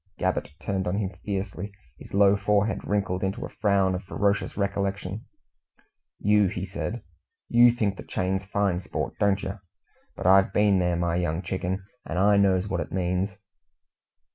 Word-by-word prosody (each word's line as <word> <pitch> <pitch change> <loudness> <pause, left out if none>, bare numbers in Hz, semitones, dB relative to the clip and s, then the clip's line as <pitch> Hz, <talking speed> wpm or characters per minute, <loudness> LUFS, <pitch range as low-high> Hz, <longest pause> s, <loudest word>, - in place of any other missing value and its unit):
Gabbett 95 -4 -1
turned 95 -2 -2
on 90 - 0
him 100 -3 -1
fiercely, 100 0 -4 0.3
his - - -12
low 100 0 +6
forehead 105 +1 +1
wrinkled 100 -2 0
into 100 +6 -2
a - - -8
frown 100 -3 +3
of 90 - -4
ferocious 100 +1 -1
recollection. 100 0 -2 0.9
"You!" 105 -1 +3
he 95 0 -3
said 115 +4 -5 0.5
"You 120 0 +7
think 105 -5 -1
the - - -7
chain's 95 +1 -1
fine 95 -2 0
sport, - - -4
don't 100 -1 +2
yer? 95 +1 -5 0.5
But - - -7
I've 95 +1 +6
been 105 -2 +4
there, 90 -1 +1
my 85 0 0
young 85 0 -1
chicken, 95 +1 -3 0.2
and 85 - -5
I 100 +2 +5
knows 95 -1 +3
what 90 -3 -2
it - - -6
means." 95 +1 -1
95 Hz, 165 wpm, -26 LUFS, 95-100 Hz, 0.9 s, You